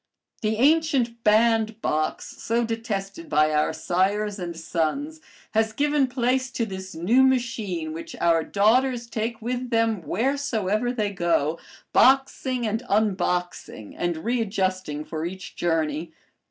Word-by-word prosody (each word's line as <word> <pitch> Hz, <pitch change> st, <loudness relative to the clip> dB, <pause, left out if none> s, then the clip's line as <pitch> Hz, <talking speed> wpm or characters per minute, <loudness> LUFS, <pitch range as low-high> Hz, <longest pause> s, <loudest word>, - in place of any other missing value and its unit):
The 215 Hz, 0 st, 0 dB
ancient 270 Hz, -4 st, +2 dB
bandbox, 220 Hz, -6 st, +1 dB
so 235 Hz, +1 st, +1 dB
detested 200 Hz, -6 st, -4 dB
by 155 Hz, +1 st, +3 dB
our 150 Hz, 0 st, +2 dB
sires 195 Hz, +5 st, 0 dB
and 170 Hz, -2 st, -5 dB
sons, 230 Hz, -, -2 dB, 0.3 s
has 220 Hz, 0 st, +1 dB
given 290 Hz, +2 st, +2 dB
place 255 Hz, +1 st, 0 dB
to 230 Hz, -, 0 dB
this 190 Hz, -2 st, -7 dB
new 200 Hz, +11 st, +3 dB
machine 225 Hz, -11 st, 0 dB
which 165 Hz, -, -7 dB
our 165 Hz, -1 st, +3 dB
daughters 240 Hz, +6 st, +2 dB
take 225 Hz, 0 st, -4 dB
with 250 Hz, +1 st, -3 dB
them 225 Hz, -4 st, +1 dB
wheresoever 230 Hz, -, 0 dB
they 215 Hz, -5 st, -1 dB
go, 170 Hz, -4 st, 0 dB, 0.3 s
boxing 260 Hz, -1 st, +3 dB
and 220 Hz, +1 st, -1 dB
unboxing 180 Hz, -, -1 dB
and 175 Hz, -2 st, -1 dB
readjusting 190 Hz, -9 st, -1 dB
for 160 Hz, -1 st, -5 dB
each 185 Hz, +2 st, -6 dB
journey. 160 Hz, -1 st, -1 dB
215 Hz, 125 wpm, -24 LUFS, 175-240 Hz, 0.3 s, by